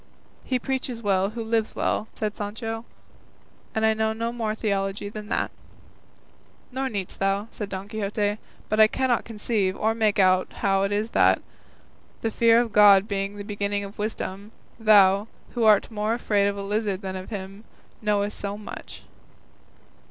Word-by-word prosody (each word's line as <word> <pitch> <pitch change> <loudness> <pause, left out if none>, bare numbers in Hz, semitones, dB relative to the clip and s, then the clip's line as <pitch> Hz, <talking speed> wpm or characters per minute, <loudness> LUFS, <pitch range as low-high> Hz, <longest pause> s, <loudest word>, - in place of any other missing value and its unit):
"He 255 - 0
preaches 250 -2 -3
well 195 -1 +2
who 230 +1 -5
lives 225 -1 0
well," 215 - 0
said 210 -1 -2
Sancho, 225 +2 -5 0.9
"and 220 0 +2
I 220 - +4
know 220 0 0
no 230 +1 -2
more 220 -3 -2
theology 200 -2 -2
than 210 0 -8
that." - - -1 1.2
"Nor 265 +1 -2
needst 200 -5 -5
thou," 195 +3 0
said 205 -2 -6
Don 190 0 -5
Quixote, 210 0 -1 0.3
"but 215 - 0
I 215 - +9
cannot 255 +1 0
conceive 210 -3 -1
or 220 +1 +1
make 220 -2 +1
out 185 -1 +3
how 195 -1 +3
it 195 +1 0
is 210 +2 -1
that, - - +4 0.8
the 225 - -1
fear 230 +1 +5
of 235 -3 -1
God 205 -1 +7
being 200 -1 -2
the 205 - -6
beginning 205 -1 -2
of 200 +2 -10
wisdom, 205 -1 -4 0.3
thou, 205 -2 +5 0.2
who 235 -2 0
art 215 +1 +5
more 215 +1 0
afraid 205 -4 +1
of 200 0 -2
a 200 - -4
lizard 205 -1 -1
than 190 -1 -4
of 185 0 -7
him, 195 -1 -7 0.4
knowest 210 -1 0
so 200 0 -3
much." 210 - -9
210 Hz, 165 wpm, -25 LUFS, 200-225 Hz, 1.2 s, I